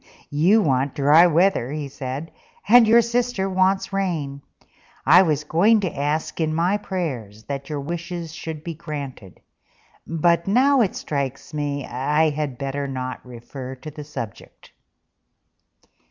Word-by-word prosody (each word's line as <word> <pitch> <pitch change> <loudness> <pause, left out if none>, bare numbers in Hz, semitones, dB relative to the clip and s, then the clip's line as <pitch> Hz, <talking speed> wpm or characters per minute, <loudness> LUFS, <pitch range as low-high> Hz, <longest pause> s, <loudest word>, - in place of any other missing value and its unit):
"You 180 +9 +4
want 135 -1 0
dry 150 +5 +6
weather," 170 -6 +2
he 150 -1 -4
said, 135 +3 -6 0.4
"and 240 -1 +7
your 230 +2 +6
sister 235 -4 -1
wants 190 +1 +1
rain. 160 -8 -2 0.6
I 170 +6 +8
was 155 -5 +1
going 200 +9 +3
to 185 - -3
ask 150 +4 -2
in 155 -1 0
my 180 +5 +2
prayers 130 - -5
that 140 +2 -6
your 150 -2 -3
wishes 170 +1 -5
should 160 -2 -7
be 170 -1 -5
granted; 145 - -8 0.7
but 170 +2 +1
now 260 +6 +4
it 205 - 0
strikes 140 0 -4
me 145 -2 -2
I 150 +5 +1
had 145 -4 -3
better 140 +1 -3
not 130 -1 -5
refer 125 +2 -9
to 135 +4 -9
the 150 0 -8
subject." 120 -8 -9
155 Hz, 140 wpm, -22 LUFS, 140-180 Hz, 0.7 s, I